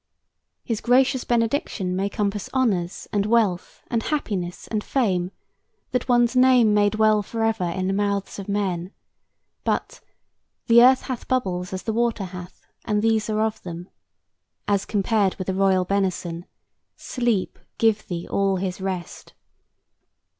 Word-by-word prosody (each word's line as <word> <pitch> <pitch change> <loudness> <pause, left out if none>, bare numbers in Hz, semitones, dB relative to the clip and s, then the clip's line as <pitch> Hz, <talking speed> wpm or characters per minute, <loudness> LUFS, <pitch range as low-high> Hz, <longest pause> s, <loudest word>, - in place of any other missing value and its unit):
His 230 -2 -3
gracious 255 +1 +3
benediction 230 -6 0
may 195 +2 0
compass 205 -1 -2
honors 200 -10 0
and 205 -1 +2
wealth 215 -6 0
and 230 -2 -1
happiness 200 -12 -3
and 215 -2 -2
fame, 185 -9 0 0.6
that 250 0 -1
one's 240 0 +3
"name 250 -4 +5
may 205 0 +4
dwell 215 0 +3
forever 225 -2 -1
in 185 +2 -2
the 190 - 0
mouths 200 0 -1
of 200 - -7
men;" 190 -3 -2 0.7
but - - -2 0.6
"The 235 0 +7
earth 260 +1 +6
hath 255 -3 -5
bubbles 185 -8 -1
as 190 -1 -5
the 220 - -2
water 230 -2 0
hath, 180 0 -10 0.2
And 210 -1 0
these 225 -1 +2
are 215 0 0
of 220 -1 -1
them," 175 +1 -8 0.8
as 200 -1 +1
compared 205 -1 +1
with 185 - -5
the 190 - -1
royal 190 -1 +2
benison, 180 -3 -2 0.5
"Sleep 240 -7 -2 0.2
give 220 -2 +2
thee 170 -1 -5
all 195 -1 +1
his 185 0 -3
rest." 185 -3 -5
205 Hz, 145 wpm, -23 LUFS, 185-230 Hz, 0.8 s, The